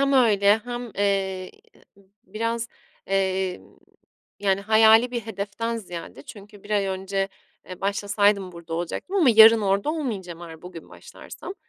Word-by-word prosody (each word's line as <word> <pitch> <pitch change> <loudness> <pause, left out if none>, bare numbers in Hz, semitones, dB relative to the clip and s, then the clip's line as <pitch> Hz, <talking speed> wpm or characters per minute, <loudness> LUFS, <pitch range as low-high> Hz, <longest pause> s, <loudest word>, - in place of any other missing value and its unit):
Hem 275 0 +2
öyle 210 -5 +4
hem, 240 +1 -7
eee, 195 -2 -1 0.8
biraz, 230 +1 -3 0.4
emm, 190 -1 -2 0.6
yani 195 -1 +1
hayali 220 +3 +5
bir 240 -1 -3
hedeften 220 +2 -4
ziyade 175 -9 -9
çünkü 205 +4 -13
1 205 - -14
ay 200 -2 +1
önce, 195 +1 -2 0.4
eee, 185 0 -10
başlasaydım 200 -1 +1
burada 170 -1 -8
olacaktım 175 - -4
ama 315 -10 +5
yarın 225 0 +8
orada 200 +7 0
olmayacağım 195 - -5
eğer 160 -1 -11
bugün 180 -2 -11
başlarsam. 380 - -11
200 Hz, 135 wpm, -24 LUFS, 190-225 Hz, 0.8 s, yarın